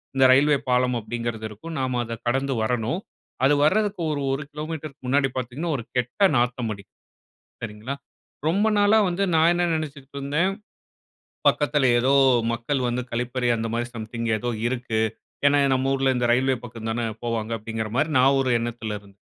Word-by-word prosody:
இந்த 135 - +4
ரயில்வே 145 +2 +5
பாலம் 125 0 +2
அப்பிடிங்கிறது 115 0 -4
இருக்கும். 160 +11 -8
நாம 130 -2 -1
அத 115 - -5
கடந்து 135 +2 +1
வரணும். 120 +7 -1 0.5
அது 145 - +5
வரதுக்கு 205 +4 +2
ஒரு 145 -1 -2
1 135 - -1
கிலோமீட்டருக்கு 155 -3 -6
முன்னாடி 135 +1 +3
பார்த்தீங்கன்னா, 130 +6 -3
ஒரு 120 - -6
கெட்ட 125 - 0
நாத்தம் 120 -1 0
அடிக்கும். 100 -1 -15 0.7
சரிங்களா! 110 +4 -5 0.5
ரொம்ப 200 +6 +2
நாளா 205 +2 +5
வந்து 180 +2 -1
நான் 160 +1 +5
என்ன 175 0 +1
நினச்சிட்டிருந்தேன், 145 +3 -2 1.0
"பக்கத்தில 145 -2 +2
ஏதோ 130 +3 +2 0.4
மக்கள் 120 +4 -1
வந்து 120 +1 -1
கழிப்பறை 125 +1 -1
அந்தமாரி 115 +1 -2
சம்திங் 115 +1 -4
ஏதோ 120 +3 -2 0.2
இருக்கு." 120 -3 -2 0.5
ஏன்னா, 145 0 +5 0.2
நம்ம 130 +1 0
ஊர்ல 135 -1 +2
இந்த 120 0 +1
ரெயில்வே 130 +1 +2
பக்கம் 115 -1 -7
தானே 115 0 -1 0.2
போவாங்க, 115 -1 -2
அப்பிடிங்கிறமாரி 115 +7 -2
நான் 135 +2 +5
ஒரு 130 -2 +1
எண்ணத்தில 115 -2 -4
இருந்தேன். 100 -1 -21
125 Hz, 150 wpm, -24 LUFS, 115-145 Hz, 1.0 s, ரயில்வே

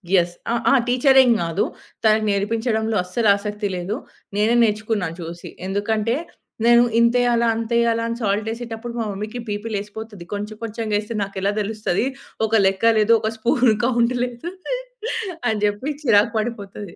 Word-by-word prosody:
Yes. 175 -1 +2 0.2
ఆ - - +2 0.2
ఆ! - - +5
టీచరేం‌గాదు 245 - +4 0.4
తనకి 215 0 +4
నేర్పించడంలో 220 +2 0
అస్సలు 215 +5 -1
ఆసక్తి 210 0 -3
లేదు. 180 +4 -3 0.4
నేనే 220 +3 +3
నేర్చుకున్నాను, 210 -5 -1
చూసి. 170 +1 -7 0.2
ఎందుకంటే, 215 +3 0 0.5
నేను 240 0 +7 0.2
ఇంతెయ్యాలా, 235 0 +3
అంతెయ్యాలా, 230 0 +1
అని 230 0 -3
సాల్ట్ 210 +2 0
యేసేటప్పుడు, 230 0 -6
మా 225 - -1
మమ్మీకి 215 +5 -5
బీపీ 205 +2 -3
లేసిపోతది. 205 -2 -7
కొంచెం 210 +1 -5
కొంచెంగా 220 -1 -2
ఎస్తే, 215 +2 -6
నాకెలా 195 +1 -2
తెలుస్తది? 210 0 -1 0.4
ఒక 220 - -7
లెక్క 195 +4 +3
లేదు, 215 +2 +4
ఒక 220 - -1
స్పూన్ 240 +2 +3
కౌంట్ 240 0 +2
లేదు, 245 +7 -6 1.0
అని 220 - 0
జెప్పి 205 +7 -1
చిరాకు 220 -3 +4
పడిపోతది. 205 -4 -5
220 Hz, 140 wpm, -22 LUFS, 205-235 Hz, 1.0 s, నేను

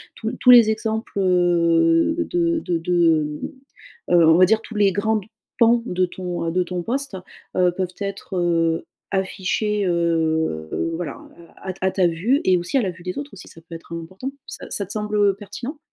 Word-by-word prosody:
Tous 220 - -4
l 245 - -7
tous 250 - +6
les 235 -3 +8
exemples, 220 0 -3
heu, 170 - +3 0.2
de 335 -1 +1
de 175 - -2
de, 165 -2 +2 0.8
hem, - - +4
heu, 165 - +5
on 160 - +6
va 185 - +7
dire 220 +3 +2
tous 225 - -11
les 205 -2 +3
grandes 210 0 0 0.3
pans, 235 0 +5
de 185 +1 +1
ton, 180 -1 -5
heu, - - 0
de 180 +2 +1
ton 180 0 -4
poste, 260 0 -3 0.4
heu, 180 -1 +4
peuvent 180 0 -4
être, 200 -1 -5
heu, 165 -2 +1 0.3
affichés, 195 +2 -1
heu, 160 - 0 0.3
voilà, 165 -4 -5
hein, - - -15 0.3
à 190 - -8
à - - -2
t - - -18
à 190 - +2
ta 185 -2 +2
vue 200 - +1
et 185 -1 +4
aussi 175 +10 -1
à 260 - +3
la 190 - -1
vue 170 0 -15
des 180 0 -5
autres 285 0 -6
aussi, 190 - -11
ça - - -13
peut 170 - -11
être 165 - -13
important. 185 +11 -6 0.2
Ça - - -8
ça 200 - -2
te - - -8
semble, 210 0 -3
heu, 200 -2 +3
pertinent? 235 - -7
185 Hz, 210 wpm, -22 LUFS, 170-215 Hz, 0.8 s, les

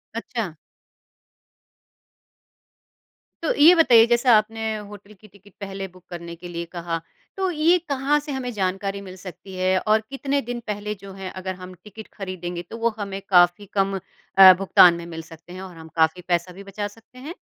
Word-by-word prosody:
अच्छा? 230 -7 -4 2.9
तो - - +1
ये 315 +5 +7
बताइए 240 -9 +7
जैसे 240 +1 +2
आपने 225 0 +3 0.3
होटल 205 0 -13
की 215 +2 -18
टिकट 200 0 -21
पहले 195 -1 -6
बुक 185 0 -19
करने 170 -1 -7
के 175 +1 -10
लिए 170 -1 -5
कहा। 170 -1 -4 0.4
तो 380 -1 0
ये 330 +3 +3
कहाँ 280 +2 +1
से 295 0 -8
हमें 255 -2 -3
जानकारी 195 0 -2
मिल 185 -1 -10
सकती 185 +1 -11
है 185 0 +1
और 215 0 +2
कितने 275 +1 -1
दिन 240 +1 -5
पहले 210 0 -3
जो 195 - -10
है 190 -1 -7
अगर 185 0 -4
हम 185 0 -10
टिकट 215 +1 -11
खरीदेंगे 180 -3 -5
तो 230 - -7
वो 235 0 +1
हमें 195 -1 -5
काफ़ी 175 +2 +4
कम 195 -1 +1 0.4
अ, 190 -1 +11
भुगतान 180 -2 +6
में 170 0 -7
मिल 165 -1 -7
सकते 165 +2 -14
हैं 185 - -8
और 185 -2 -10
हम 160 0 -11
काफ़ी 160 +2 +2
पैसा 175 +1 0
भी 195 +2 -11
बचा 205 +1 -5
सकते 225 +4 -19
हैं? 300 +6 -7
195 Hz, 180 wpm, -23 LUFS, 180-225 Hz, 2.9 s, अ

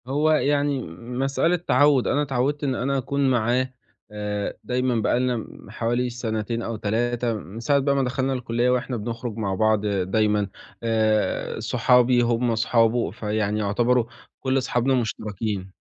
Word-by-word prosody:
هو 150 +4 +2
يعني 145 -2 +2
م 115 +8 -7
مسألة 135 +6 +2
تعود، 145 -5 +3
أنا 145 - +2
اتعودت 140 +1 -1
إن 135 -2 0
أنا 135 +3 0
أكون 135 +1 0
معاه، 125 +2 +1 0.4
آآ 105 -1 -3
دايمًا 125 0 0
بقى 120 - +1
لنا 125 -1 +1
م 110 - -10
حوالي 120 +2 -1
سنتين 115 -1 -3
أو 115 0 -4
3 115 +3 -1
من 105 +1 -7
ساعة 140 +5 +2
بقى 140 0 +1
ما 135 - +2
دخلنا 130 +1 -1
الكُلِّيَّة 120 -1 0
وإحنا 125 0 0
بنخرُج 115 +1 -5
مع 100 -3 -1
بعض 110 0 +2
دايمًا، 105 +1 +1 0.4
آآ 110 -2 0
صحابي 125 0 +3
هُم 120 0 +1
صحابه، 115 +1 +2
فيعني 105 0 -1
يعتبروا 115 +4 +2 0.3
كُلّ 130 0 +1
صحابنا 125 +1 +1
مُشتركين، 105 -5 -3
120 Hz, 150 wpm, -24 LUFS, 110-130 Hz, 0.4 s, تعود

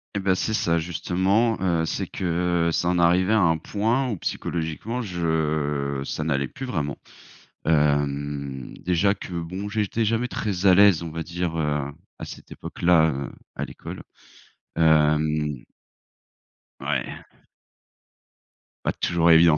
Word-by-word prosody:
Eh - - +1
bah, 95 -1 +2
c'est 110 - -1
ça 85 -5 +2
justement, 95 +7 +1
heu, 85 -3 +1
c'est - - -2
que, - - -7 0.5
heu, - - 0
ça 85 - 0
en 90 0 +2
arrivait 90 +4 +4
à 110 - +5
un 80 -2 +3
point 115 - 0
où, 105 - -2
psychologiquement, 85 +11 -3
je 75 - -1
ça 80 - -3
n'allait 70 -3 0
plus 135 - -7
vraiment. 75 - -2 0.7
Hem, 70 -3 0
déjà 90 +3 +2
que 95 - -9
bon 90 +5 -4
j'étais 110 +1 0
jamais 115 +3 +1
très 100 -6 -3
à 95 - +8
l'aise, 100 -4 +6
on 80 - -5
va 80 +1 -4
dire, 85 0 -3
heu, 75 -2 -1 0.3
à - - -5
cette - - -11
époque-là, 85 -2 +2
heu, 70 0 -4 0.2
à - - -3
l'école, - - -8 0.7
hem 75 -3 +3 1.2
Ouais. - - -2 1.7
Pas - - +2
toujours 85 -1 +2
évident. 80 -1 +7
85 Hz, 140 wpm, -24 LUFS, 75-95 Hz, 1.7 s, à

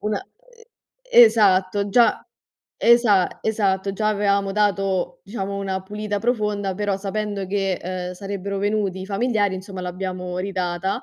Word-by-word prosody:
una, 210 0 -1
ehm 470 +4 -18 0.6
esatto, 200 -2 +3
già, 235 +4 +4 0.6
esa 230 -6 +4
esatto, 195 -3 0
già 215 +2 0
avevamo 200 -1 +1
dato, 195 -3 0
diciamo, 200 -1 -5
una 190 -1 -3
pulita 210 +1 -4
profonda, 210 -4 -1
però, 205 0 -1
sapendo 200 0 -3
che, 195 0 0
ehm, 180 0 -5
sarebbero 200 +1 -5
venuti 200 -2 -1
i - - -5
familiari, 205 -1 0
insomma, 185 0 -7
l'abbiamo 180 0 -4
ridata. 190 +3 -2
200 Hz, 130 wpm, -22 LUFS, 190-210 Hz, 0.6 s, già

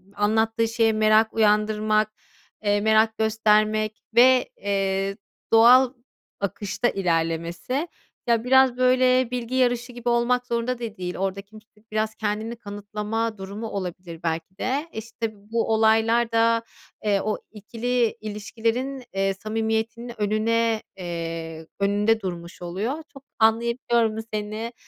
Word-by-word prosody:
anlattığı 220 +2 +1
şeye 225 -1 +2
merak 215 +1 +3
uyandırmak, 215 0 +2 0.5
eee, 205 0 +2
merak 220 +1 +3
göstermek 215 0 +1
ve, 255 +1 +6
eee, 195 0 -1 0.4
doğal 245 +3 +7 0.5
akışta 200 +4 -1
ilerlemesi. 170 - -1 0.4
Ya, 230 -1 +2
biraz, 260 -1 +4
böyle, 255 0 +3
bilgi 250 0 -3
yarışı 245 -1 +1
gibi 240 0 -3
olmak 245 +1 +1
zorunda 235 +2 -1
da 225 -3 -6
değil. 180 -1 -4
Orada 195 +1 -2
kimse 215 +2 -17 0.2
biraz 215 0 -1
kendini 215 +2 -3
kanıtlama 210 +1 -4
durumu 200 +4 -6
olabilir 180 -4 -6
belki 165 +3 -3
de. 275 +8 -1
İşte, 225 0 -5 0.2
bu 230 -1 +1
olaylar 225 +1 +3
da, 230 0 +3 0.4
eee, 205 -2 +2
o 215 - -1
ikili 230 +3 -1
ilişkilerin, 230 +5 -3
eee, 195 0 +1
samimiyetinin 225 +3 -3
önüne, 220 +2 +1 0.2
eee, 165 -2 -5
önünde 205 +3 +2
durmuş 175 -2 -6
oluyor. 190 +9 -2 0.2
Çok 275 -1 -13 0.2
anlayabiliyorum 230 0 +2 0.2
seni. 215 +2 -4
220 Hz, 120 wpm, -24 LUFS, 205-235 Hz, 0.5 s, doğal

